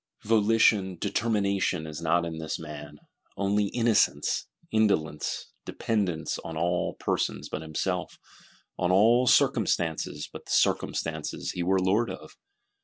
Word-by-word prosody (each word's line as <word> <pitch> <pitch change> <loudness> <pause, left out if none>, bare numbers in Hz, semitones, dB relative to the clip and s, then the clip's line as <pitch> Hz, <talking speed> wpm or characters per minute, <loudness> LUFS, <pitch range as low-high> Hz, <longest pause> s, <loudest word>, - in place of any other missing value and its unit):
Volition, 105 -3 +3
determination 100 -5 0
is 75 -1 -7
not 85 +1 +2
in 80 -1 -5
this 80 -1 -3
man: 75 -2 -9 0.4
only 100 +1 +1
innocence, 115 +1 +1 0.2
indolence; 80 -9 0
dependence 90 -9 -2
on 80 -1 -7
all 85 +2 0
persons - - -2
but 75 - -4
himself, 90 +4 -3 0.6
on 90 0 +1
all 115 +6 +5
circumstances 80 -8 +1
but - - -9
the - - -7
circumstances 80 -2 0
he 90 - -4
were 95 +2 +2
lord 100 +6 +2
of. - - -9
90 Hz, 120 wpm, -27 LUFS, 80-105 Hz, 0.6 s, all